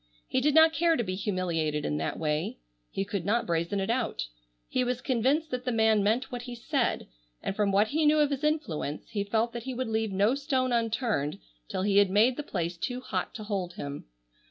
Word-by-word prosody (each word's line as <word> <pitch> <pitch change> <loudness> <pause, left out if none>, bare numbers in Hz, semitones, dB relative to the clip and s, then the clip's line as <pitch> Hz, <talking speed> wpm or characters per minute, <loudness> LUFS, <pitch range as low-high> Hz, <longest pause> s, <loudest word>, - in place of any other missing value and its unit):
He - - +1
did 295 +2 +2
not 320 0 +7
care 335 0 +3
to 240 - 0
be 185 -3 -3
humiliated 175 -6 -1
in 75 - -1
that 80 - -2
way. 150 -1 -1 0.3
He 195 - -2
could 200 -3 -3
not 225 +6 +1
brazen 170 +3 0
it 195 +3 0
out. 235 - -1 0.4
He 255 - 0
was 250 0 -1
convinced 265 +6 +1
that 250 0 -2
the 250 - -1
man 220 -2 +4
meant 230 +6 +1
what 245 -1 -4
he 245 0 -7
said, 250 +1 0 0.4
and 195 - -2
from 205 -1 +2
what 205 +2 +3
he 310 +1 +2
knew 305 +1 +5
of 295 -1 +3
his 280 +1 -2
influence 185 - -1
he 205 -2 -1
felt 225 +3 0
that 235 - -4
he 260 -1 -4
would 255 -1 -2
leave 220 -1 0
no 200 +5 +3
stone 270 -2 0
unturned 225 - 0 0.3
till 185 - -2
he 200 0 +2
had 200 -1 +6
made 220 +6 +4
the - - -3
place 175 - -3
too 245 +8 -3
hot 255 - -3
to 215 - -6
hold 195 -4 -3
him. 140 -2 -6
220 Hz, 225 wpm, -28 LUFS, 195-255 Hz, 0.4 s, not